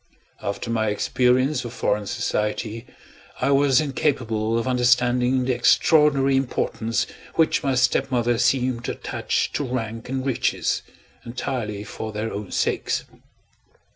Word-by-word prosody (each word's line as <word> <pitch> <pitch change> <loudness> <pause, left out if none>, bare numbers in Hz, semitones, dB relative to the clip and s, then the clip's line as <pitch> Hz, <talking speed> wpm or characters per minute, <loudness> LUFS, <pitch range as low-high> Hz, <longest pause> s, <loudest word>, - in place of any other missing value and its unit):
After 100 +3 -3
my 110 -1 +1
experience 125 +6 +1
of 120 -1 -7
foreign 105 -4 -1
society, 105 +4 -2 0.5
I 135 - +1
was 140 -2 +4
incapable 115 -7 0
of 115 - -1
understanding 125 0 +2
the 130 - +1
extraordinary 140 +2 +4
importance 115 -3 -1 0.3
which 160 -1 +3
my 135 -2 0
stepmother 125 -2 +1
seemed 125 -1 +1
to - - -2
attach - - -2
to - - -1
rank 115 -3 -4
and 130 0 -2
riches, 130 -4 0 0.4
entirely 115 -4 -4
for 110 +1 -6
their 110 +1 -4
own 100 -1 -5
sakes. - - -1
125 Hz, 125 wpm, -23 LUFS, 115-130 Hz, 0.5 s, was